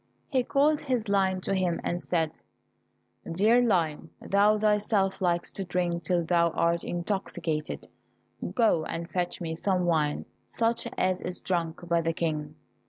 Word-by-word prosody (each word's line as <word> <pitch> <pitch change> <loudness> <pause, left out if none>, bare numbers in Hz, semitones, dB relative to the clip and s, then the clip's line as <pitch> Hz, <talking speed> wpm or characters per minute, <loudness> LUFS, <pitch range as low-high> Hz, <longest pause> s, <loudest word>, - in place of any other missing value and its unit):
He 260 -3 +2
called 290 +4 +2
his 245 -6 -1
lion 190 -2 +2
to 195 - -1
him 185 -3 0
and 175 +1 -2
said, 160 -3 -1 0.9
"Dear 215 +8 +4
Lion, 170 -10 +1
thou 205 +2 +3
thyself 210 -2 +1
likest 175 -1 0
to 195 - -2
drink 175 -1 -1
till 175 -1 0
thou 170 0 +3
art 170 0 +1
intoxicated, 175 -4 -3 0.7
go 220 -9 +3
and 165 +1 -4
fetch 180 -1 -2
me 165 -1 -3
some 180 +2 0
wine, 155 -4 +1 0.2
such 230 0 0
as 185 0 +1
is 180 0 -3
drunk 170 -1 -2
by 170 -1 +2
the 165 0 0
King." 155 -2 -2
180 Hz, 150 wpm, -28 LUFS, 170-200 Hz, 0.9 s, Dear